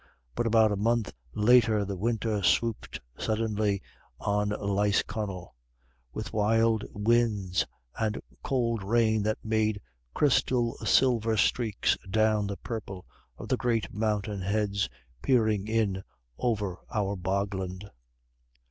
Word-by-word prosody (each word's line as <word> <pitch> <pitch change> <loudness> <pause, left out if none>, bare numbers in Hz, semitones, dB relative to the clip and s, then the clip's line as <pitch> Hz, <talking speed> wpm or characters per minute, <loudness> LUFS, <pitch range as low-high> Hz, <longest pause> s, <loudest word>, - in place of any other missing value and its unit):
But 120 - -1
about 110 -1 +4
a - - +1
month 115 +1 +1 0.2
later 110 -2 +4
the 100 0 -4
winter 110 +1 -1
swooped 115 +4 +1 0.2
suddenly 105 -3 0 0.4
on 105 0 0
Lisconnel: 100 -2 -1 0.6
with - - -6
wild 110 +1 +2
winds 105 -4 +1 0.3
and 110 -1 0 0.2
cold 115 -4 0
rain 110 +1 +2
that 110 +1 0
made 110 -1 +1 0.4
crystal 125 -4 +2
silver 115 -4 +2
streaks 110 0 +1
down 110 0 +2
the 100 0 -4
purple 100 -6 -6 0.3
of - - -8
the - - +1
great 115 -3 -1
mountainheads 105 - -1 0.3
peering 110 -5 +2
in 110 -4 0 0.3
over 105 - -1
our 100 -4 0
bogland. 95 0 -3
105 Hz, 110 wpm, -28 LUFS, 100-115 Hz, 0.6 s, about